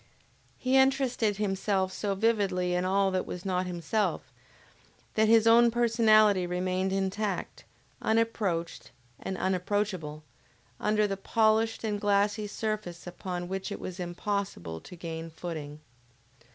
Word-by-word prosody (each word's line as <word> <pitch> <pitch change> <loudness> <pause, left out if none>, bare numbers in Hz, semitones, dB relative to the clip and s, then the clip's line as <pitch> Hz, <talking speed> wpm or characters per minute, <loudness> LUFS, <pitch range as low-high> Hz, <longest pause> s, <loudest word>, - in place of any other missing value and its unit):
He 255 +1 +2
interested 260 -6 +2
himself 195 -2 0
so 200 -2 -2
vividly 195 -4 +1
in 180 +1 0
all 195 +1 +2
that 185 0 -1
was 180 +2 -6
not 185 -1 0
himself, 180 +5 -2 0.8
that 220 0 +3
his 225 0 +5
own 235 +1 +7
personality 215 -5 +4
remained 185 +1 -1
intact, 195 +1 -2 0.4
unapproached 220 -7 -1 0.3
and 190 - -4
unapproachable, 185 -5 -1 0.6
under 210 0 +2
the 195 -1 -2
polished 220 +2 +2
and 210 -2 -2
glassy 205 +1 +1
surface 210 -5 -4
upon 175 0 -5
which 190 +2 -4
it - - -5
was 185 0 -7
impossible 175 - -3
to - - -11
gain 165 -1 -6
footing. 155 -3 -7
195 Hz, 125 wpm, -29 LUFS, 180-215 Hz, 0.8 s, own